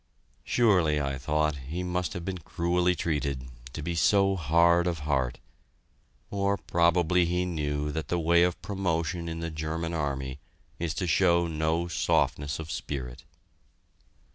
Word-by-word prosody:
Surely, 90 - +3
I 70 -2 -2
thought, 75 +1 0
he 75 +7 -5
must 90 0 -2
have 85 -1 -6
been 95 -1 -3
cruelly 90 +2 0
treated, 70 -6 -2 0.3
to 75 - -5
be 85 - -2
so 95 +3 +3
hard 85 +1 +3
of 85 -3 -2
heart 65 -4 0 0.9
or 100 0 +1
probably 85 0 +2
he 90 +1 0
knew 75 -3 -2
that 80 +1 -4
the 90 - 0
way 85 +1 +4
of 90 0 +2
promotion 85 -3 -2
in 80 0 -5
the 85 0 -3
German 80 +2 -3
army 70 -4 -3 0.4
is 85 -2 -2
to 95 - -1
show 85 +1 +3
no 80 +1 0
softness 75 -3 0
of 80 0 -6
spirit. 65 -2 -5
85 Hz, 145 wpm, -28 LUFS, 75-90 Hz, 0.9 s, way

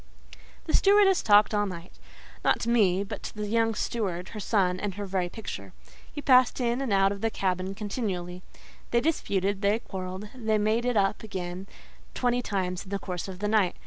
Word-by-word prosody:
The - - -3
stewardess 395 -1 +5
talked 205 0 +5
all 205 0 +1
night; 175 -1 -8 0.5
not - - +3
to 230 - -2
me 200 -5 +3
but 205 +1 -7
to - - -7
the 210 0 -3
young 225 +1 +1
steward, 190 -7 -2
her 215 - -7
son 190 -4 +1
and 200 -2 -3
her 205 0 -4
very 185 -2 -1
picture. 220 +4 -7 0.4
He 290 - -7
passed 255 -2 +5
in 240 +1 0
and 265 -5 -2
out 195 0 +4
of 200 -1 -5
the 225 - +1
cabin 185 -1 -2
continually: 195 -5 -4 0.5
they 235 - +3
disputed, 200 - 0
they 205 +1 +3
quarrelled, 190 -1 -6
they 220 -4 0
made 215 +3 +1
it 245 -3 +1
up 195 0 +1
again 185 -3 -6 0.5
twenty 245 0 +1
times 185 -5 -2
in - - -12
the 200 - -1
course 180 -2 -5
of 190 -1 -7
the 210 +2 -2
night. 210 -4 +2
205 Hz, 195 wpm, -27 LUFS, 185-225 Hz, 0.5 s, stewardess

